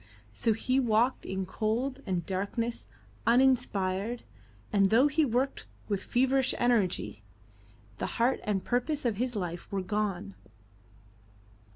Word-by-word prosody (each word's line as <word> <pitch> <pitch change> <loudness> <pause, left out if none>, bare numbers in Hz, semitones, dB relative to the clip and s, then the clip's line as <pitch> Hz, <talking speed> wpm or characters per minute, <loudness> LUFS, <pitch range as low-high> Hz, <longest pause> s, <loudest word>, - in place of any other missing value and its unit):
So 225 - +1
he 255 +4 +1
walked 240 +1 +2
in 190 0 -2
cold 235 +7 -1
and 180 -3 -1
darkness, 200 - -3 0.4
uninspired, 230 -4 +2 0.5
and 200 -1 +5
though 230 +7 +5
he 305 +2 +2
worked 260 +1 0 0.2
with 200 -3 -1
feverish 265 +1 +2
energy, 215 - +1 0.8
the - - -1
heart 240 +3 +2
and 200 -3 -1
purpose 255 +4 -1
of 225 -4 +1
his 245 +1 -1
life 175 -3 -4
were 195 -2 -1
gone. 195 - -2
225 Hz, 125 wpm, -30 LUFS, 195-255 Hz, 0.8 s, and